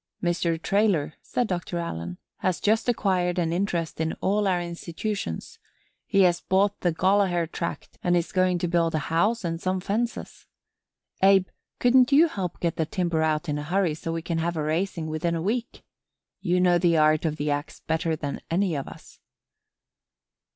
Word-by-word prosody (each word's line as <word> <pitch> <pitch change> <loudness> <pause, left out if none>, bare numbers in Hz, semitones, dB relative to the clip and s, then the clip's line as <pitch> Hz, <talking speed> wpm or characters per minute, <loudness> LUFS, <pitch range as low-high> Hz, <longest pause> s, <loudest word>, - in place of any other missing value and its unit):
"Mr. 170 -1 0
Traylor," 195 -6 +1
said 245 - -1
Doctor 175 -2 -3
Allen, 85 - -4 0.2
"has 180 -5 -1
just 225 +3 +1
acquired 185 -6 +1
an 165 -2 0
interest 170 -4 -1
in 160 0 0
all 205 +1 0
our 180 -2 +2
institutions. 170 - -5 0.5
He 195 - +3
has 175 -2 +3
bought 195 +2 +1
the 175 - +1
Gollaher 185 0 +2
tract 170 +1 -6
and 175 -1 +3
is 170 - -2
going 185 -1 +2
to 175 - -1
build 165 -1 +1
a 155 +1 -3
house 210 +7 +2
and 165 -1 -3
some 185 0 0
fences. 215 +5 -3 0.7
Abe, 195 -1 +6 0.3
couldn't 250 +1 +4
you 305 +5 +6
help 185 - -4
get 170 -2 -1
the 160 - 0
timber 170 -2 0
out 155 +1 0
in 150 -1 -1
a - - -4
hurry 175 +1 +1
so 165 +2 -5
we 165 0 -3
can 170 -1 -2
have 170 +1 -1
a 155 - -1
raising 165 +2 -1
within 160 +2 -1
a - - -1
week? 235 +5 -2 0.6
You 180 -1 +1
know 180 -1 +4
the 170 -2 +3
art 155 0 +4
of 155 -2 0
the 150 0 -1
ax 145 +2 -4
better 160 0 -1
than 145 -2 -5
any 185 +1 +1
of 140 -3 -3
us." - - -13
175 Hz, 180 wpm, -26 LUFS, 160-195 Hz, 0.7 s, Abe